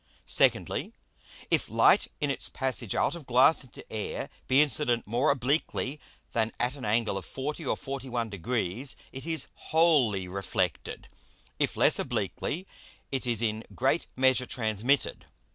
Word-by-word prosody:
Secondly, - - +2 0.6
If - - +2
Light - - +5
in 145 -1 +1
its - - -3
passage 130 -6 -2
out - - +2
of 170 -5 -9
Glass 130 +6 +5
into 130 - -12
Air 110 -1 -4 0.2
be 130 +1 +4
incident 145 -5 +2
more 120 +8 +1
obliquely 140 +1 0 0.3
than 115 -1 0
at 125 +3 0
an 135 - -10
Angle 105 -2 +1
of 95 - -12
40 150 +5 -4
or - - 0
41 125 -4 -4
Degrees 115 - -2 0.2
it 135 +4 -8
is 160 -4 -1
wholly 140 - +2
reflected, 95 0 -3 0.5
if - - 0
less - - +5
obliquely 180 +5 -2 0.5
it 130 -2 -2
is 120 -1 +2
in 110 0 -1
great 135 +6 +1
measure 130 -1 +3
transmitted. 115 +3 0
130 Hz, 145 wpm, -28 LUFS, 115-140 Hz, 0.6 s, Light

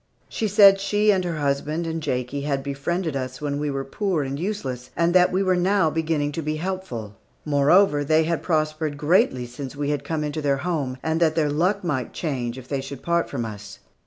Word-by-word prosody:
She 220 - -2
said 200 -1 +7
she 205 +2 +2
and 190 -2 +1
her 170 -3 -3
husband 145 +3 -1
and 165 0 -3
Jakie 130 -1 -2
had 140 -1 -1
befriended 150 +4 -2
us 130 -1 -4
when 145 -1 -2
we 150 0 -1
were 135 -1 -3
poor 185 0 -1
and 135 +1 -4
useless, 140 - -4
and 170 +1 +2
that 180 -1 +5
we 190 +2 +1
were 185 -1 +2
now 180 -2 +2
beginning 155 -2 0
to 165 - -4
be 155 0 -2
helpful. 155 - -5 0.3
Moreover, 150 +3 +4
that 145 - -3
they 160 +1 +4
had 165 +1 -1
prospered 155 -2 -1
greatly 150 - +2
since 130 +3 -8
we 145 0 -1
had 145 -1 -2
come 155 +1 -2
into 150 +1 -3
their 140 -2 +1
home, 145 -8 -2
and 160 0 0
that 160 -2 +3
their 150 -3 +1
luck 185 +7 +1
might 140 -8 -2
change 130 -6 -3
if 130 -1 -10
they 140 -1 -2
should 135 -1 -8
part 170 0 +1
from 120 -4 -3
us. 105 -2 -8
150 Hz, 220 wpm, -24 LUFS, 140-175 Hz, 0.3 s, said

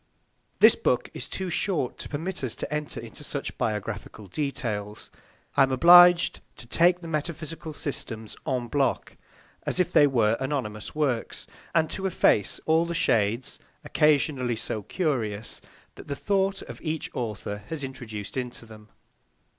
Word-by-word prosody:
This - - +8
book 460 - 0
is - - -6
too 190 -2 -3
short 170 -7 -1
to - - -7
permit 165 +3 -4
us 125 - -2
to - - -4
enter 150 -1 -2
into - - -9
such - - -4
biographical 105 0 -3
details. 105 - -4 0.4
I - - +4
am 135 0 +4
obliged 175 +5 +7 0.2
to - - -10
take 175 +7 +3
the 170 - -7
metaphysical 160 0 -4
systems 115 -7 -5
en 125 -4 -1
bloc, 135 +1 0 0.5
as - - -2
if 180 -1 +2
they 145 - +7
were 115 -4 +2
anonymous 130 -6 -3
works, 135 -7 -1 0.3
and 160 -1 +4
to 190 - -2
efface 110 - +2
all 160 +1 +3
the 170 - -3
shades, 115 -1 +1 0.2
occasionally 140 -5 +2
so 110 -1 -3
curious, 115 - -2 0.3
that - - -12
the 140 - -3
thought 195 +3 0
of - - -10
each 160 -1 -3
author 105 -3 -4
has 160 -3 -4
introduced 110 -6 -7
into 125 -2 -4
them. 110 -1 -14
135 Hz, 150 wpm, -26 LUFS, 110-160 Hz, 0.5 s, This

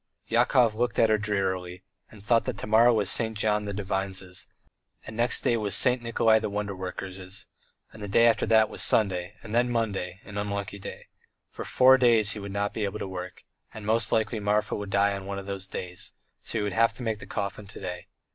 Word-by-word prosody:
Yakov 120 0 +3
looked 120 +2 -1
at 115 -1 +4
her 110 - +3
drearily 95 -3 -2 0.3
and 105 -3 -15
thought 115 +1 +2
that - - -3
to - - -5
morrow 110 +3 +5
was 110 -3 +1
St. 110 -2 -1
John 105 0 +1
the 100 - -3
Divine's, 95 -2 -3 0.6
and 110 - -8
next 120 +2 +3
day 110 -3 0
St. 125 +5 +3
Nikolay 115 -1 +3
the 110 - -3
Wonder 100 -1 -3
worker's, 95 +1 -7 0.5
and 110 - -12
the 105 - -5
day 115 +4 +4
after 115 - +3
that 110 -1 +5
was - - -5
Sunday, 95 -2 +2
and 110 - -8
then 120 +1 +2
Monday, 100 -6 -2
an 100 -1 -6
unlucky 100 0 -4
day. - - -9 0.5
For - - -7
four 130 +1 +5
days 115 -4 +4
he 105 - -4
would 100 -1 -7
not 100 +1 -2
be 110 - -3
able 100 +1 -2
to 100 - -5
work, 90 -1 -7 0.3
and 110 -2 -8
most 110 +1 +2
likely 110 0 0
Marfa 105 +1 0
would 105 -1 -5
die 100 0 +2
on 100 0 -7
one 100 0 -4
of 100 - -6
those 95 -1 -5
days; 90 0 -7 0.3
so - - -4
he 105 - 0
would 100 -2 -2
have 115 +1 +3
to 125 - -7
make 110 -2 -2
the - - -10
coffin 100 0 -4
to 100 - -10
day. 90 -2 -6
105 Hz, 220 wpm, -27 LUFS, 100-115 Hz, 0.6 s, morrow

